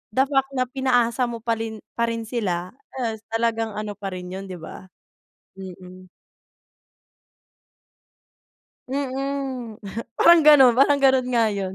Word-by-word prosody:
the 265 - +5
fact 270 -1 -1
na 255 - +2
pinaasa 250 -2 +1
mo 230 -1 -7
parin 225 -2 -3 0.2
parin 230 -1 -1
sila, 185 -7 -3 0.2
eh, 230 -4 -3
talagang 225 -1 -1
ano 215 0 -4
pa 205 -1 -7
rin 180 0 -8
'yun 195 +1 -7
'di 185 - -7
ba? 175 +2 -11 0.7
Mm. 185 -1 -11 2.8
Mm, 270 -3 -4 0.4
parang 340 -1 +7
gano'n 270 -5 +8
parang 280 +1 +4
gano'n 265 -2 +4
nga 235 -2 +2
'yun. 195 -2 -4
230 Hz, 125 wpm, -23 LUFS, 205-265 Hz, 2.8 s, gano'n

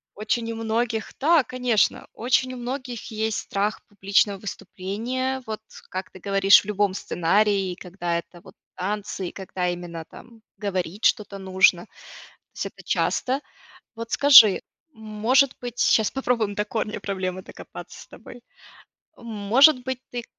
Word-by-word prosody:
Очень 230 +2 -2
у - - -7
многих 225 0 -2
да, 310 0 +4
конечно, 250 -4 0
очень 255 +2 0
у - - -7
многих 245 -1 -6
есть 220 0 -1
страх 205 +2 -2
публичного 200 0 +1
выступления, 235 +7 -4
вот 215 -1 -4 0.3
как 185 +1 -5
ты 185 - -13
говоришь 195 +1 +5
в - - -16
любом 205 -2 0
сценарии, 195 +1 +1
когда 175 -1 -3
это 175 +1 -13
вот - - -15 0.2
танцы, 195 -1 -4
и - - -13
когда 185 -2 -4
именно 175 -2 -6
там, 230 -2 -15 0.2
говорить 195 -1 -3
что-то 200 -2 +1
нужно, 190 -1 +3
то - - -34 0.7
есть - - -4
это - - -10
часто. 265 +2 0 0.6
Вот 230 0 -7
скажи, 245 -8 +8 0.3
может 220 +5 +2
быть, 245 -1 -6
сейчас 220 -2 +3
попробуем 235 -6 -1
до 210 - -1
корня 215 0 -3
проблемы 185 -2 -4
докопаться - - -11
с - - -16
тобой. 245 - -13 0.8
Может 235 +5 +4
быть 260 -1 -3
ты 240 -1 -5
210 Hz, 145 wpm, -24 LUFS, 195-240 Hz, 0.8 s, скажи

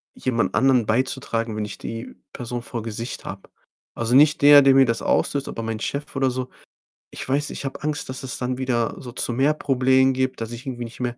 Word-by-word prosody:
jemand 120 -3 -1
anderen 125 -2 +3
beizutragen, 115 -2 -1
wenn 105 0 -2
ich 105 - -8
die 115 +1 -7 0.2
Person 120 0 -5
vor 120 0 -5
Gesicht 115 +2 -5
habe. 95 0 -8 0.5
Also, 115 +1 0
nicht 150 +2 +5
der, 145 0 +9
der 135 -1 +5
mir 135 -1 +7
das 115 -1 -1
auslöst, 140 -1 0
aber - - -5
mein 110 -1 -3
Chef 140 +6 -4
oder 135 -1 +2
so. 130 0 -4 0.6
Ich - - -6
weiß 140 +3 0
ich, - - -6
ich - - -6
habe 135 - -5
Angst, 150 -2 -3
dass 130 - -5
es 130 - -3
dann 125 0 -2
wieder 125 -3 -1
so 125 -3 -8
zu 120 0 -2
mehr 135 +5 +3
Problemen 130 -1 +3
gibt, 130 -2 -2
dass 115 0 -4
ich 120 +3 -8
irgendwie 120 -2 -4
nicht 115 - -11
mehr 120 -1 -3
125 Hz, 225 wpm, -23 LUFS, 115-135 Hz, 0.6 s, der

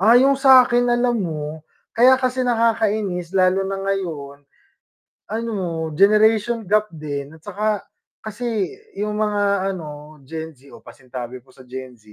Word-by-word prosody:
Ah, 225 +5 +6
yung 270 +2 +5
sakin 255 -3 +5
alam 240 0 +2
mo, 155 -3 -4 0.3
kaya 255 +3 +6
kasi 255 0 -1
nakakainis 220 -7 0
lalo 190 +1 +3
na 195 - -2
ngayon. 160 -8 -3 0.8
Ano, 195 -8 -3
generation 215 +2 +3
gap 210 +1 +3
din, 145 -2 -6
at 160 - -15
tsaka 205 +3 -2 0.4
kasi 220 -1 -3 0.2
yung 210 - -3
mga 205 -2 +1
ano, 150 -3 -9
Gen 160 +1 -6
Z 140 -1 -21
o - - -15
pasinsabi 125 -1 -8
po 125 - -32
sa 130 0 -17
Gen 130 0 -8
Z, 110 -1 -20
195 Hz, 145 wpm, -21 LUFS, 155-225 Hz, 0.8 s, Ah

